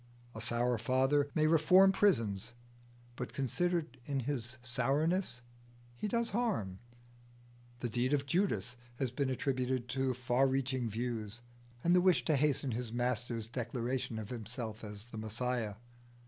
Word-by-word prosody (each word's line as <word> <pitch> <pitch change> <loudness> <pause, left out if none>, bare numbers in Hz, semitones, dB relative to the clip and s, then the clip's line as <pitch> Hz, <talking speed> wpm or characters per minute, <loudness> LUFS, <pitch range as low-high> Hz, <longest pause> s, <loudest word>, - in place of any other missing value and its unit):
A 110 - -6
sour 120 +1 +1
father 135 +4 +2
may 155 -1 +3
reform 165 +5 +6
prisons, 115 - +1 0.6
but 125 0 -5
considered 155 0 -1
in 140 -2 -1
his 125 -2 -3
sourness 135 +4 +1 0.5
he 165 - -3
does 235 +2 0
harm. 195 - -1 1.0
The 120 - -1
deed 120 +4 0
of 140 -1 +2
Judas 140 - 0 0.2
has 125 -1 -1
been 135 +1 0
attributed 130 -1 -1
to 130 +1 0
far 125 +2 +2
reaching 130 -2 0
views, 115 0 -3 0.4
and 175 +1 +4
the 180 - +6
wish 185 -1 +4
to 155 - +3
hasten 140 -2 +2
his 115 0 -3
Master's 120 -2 -1
declaration 120 0 -2
of 110 -2 -5
himself 115 -1 -5
as 105 0 -6
the 115 -2 -8
Messiah. 110 0 -1
125 Hz, 140 wpm, -34 LUFS, 115-140 Hz, 1.0 s, reform